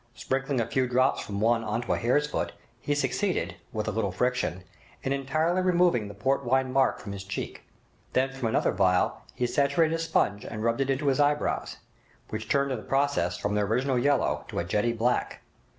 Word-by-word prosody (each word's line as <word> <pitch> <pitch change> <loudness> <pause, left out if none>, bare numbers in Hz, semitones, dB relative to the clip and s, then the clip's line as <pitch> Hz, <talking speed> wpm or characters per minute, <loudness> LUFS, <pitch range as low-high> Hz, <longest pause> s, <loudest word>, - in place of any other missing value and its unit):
Sprinkling 135 0 -1
a 115 - +1
few 130 +2 0
drops 130 +2 +2
from 100 -1 -5
one 115 +2 +2
on 110 +2 -2
to - - 0
a - - 0
hare's 130 +5 +2
foot, 150 - -3 0.3
he 145 +4 -1
succeeded, 145 +8 -1
with 110 -1 -3
a - - +1
little 105 -2 -1
friction, 125 -3 -1 0.4
in 135 - 0
entirely 155 +6 0
removing 175 - +3
the 100 - -9
port 135 +6 0
wine 130 +1 +1
mark 135 0 +3
from 100 - -7
his 100 -1 -6
cheek. 100 +1 -5 0.5
Then 130 +1 +2
from 135 -3 -2
another 110 - +1
phial 90 -2 +2
he 125 - 0
saturated 140 +5 +2
a 165 - -1
sponge 160 -11 +1
and 110 -1 -5
rubbed 115 +3 +1
it 135 - 0
into 135 +2 0
his 135 - +1
eyebrows, 145 0 +1 0.5
which 110 0 -5
turned 140 0 +2
in 130 - -1
the - - -10
process 140 +2 +1
from 105 - -2
their 105 0 +1
original 125 +4 +1
yellow 140 +1 +1
to - - -7
a - - +1
jetty 105 +7 +1
black. 120 +2 -1
130 Hz, 205 wpm, -27 LUFS, 110-140 Hz, 0.5 s, removing